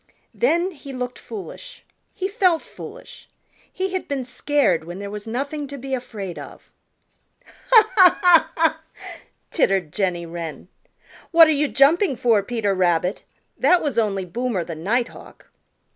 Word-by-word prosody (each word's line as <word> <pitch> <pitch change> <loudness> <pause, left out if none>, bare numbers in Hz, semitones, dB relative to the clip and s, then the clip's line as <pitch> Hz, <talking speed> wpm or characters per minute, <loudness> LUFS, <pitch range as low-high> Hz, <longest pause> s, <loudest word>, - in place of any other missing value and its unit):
Then 370 -6 +1
he 285 -4 -11
looked 250 -1 -5
foolish. 455 +4 -10 0.3
He 380 - -2
felt 370 -5 +1
foolish. - - -12 0.4
He 380 0 -3
had 375 - -3
been 270 -3 -3
scared 255 - +1
when 175 +2 -7
there 200 0 -6
was 210 +1 -8
nothing 280 +5 -3
to 280 +1 -8
be 265 +1 -6
afraid 210 -8 -5
of. - - -12 0.7
"Ha, 440 -3 +3
ha, 370 -4 +8
ha, 350 -3 +5
ha," 320 -1 +2 0.7
tittered 195 - +1
Jenny 180 -4 -1
Wren. 165 0 -7 0.6
"What 330 -1 +8
are - - +3
you 300 0 +1
jumping 290 +4 +3
for, 230 -4 +2
Peter 210 -1 -1
Rabbit? 180 0 0 0.3
That 360 -1 +3
was 275 -6 0
only 195 -4 -1
Boomer 225 0 -2
the 165 - -7
Nighthawk." 220 +10 -4
255 Hz, 145 wpm, -22 LUFS, 195-330 Hz, 0.7 s, ha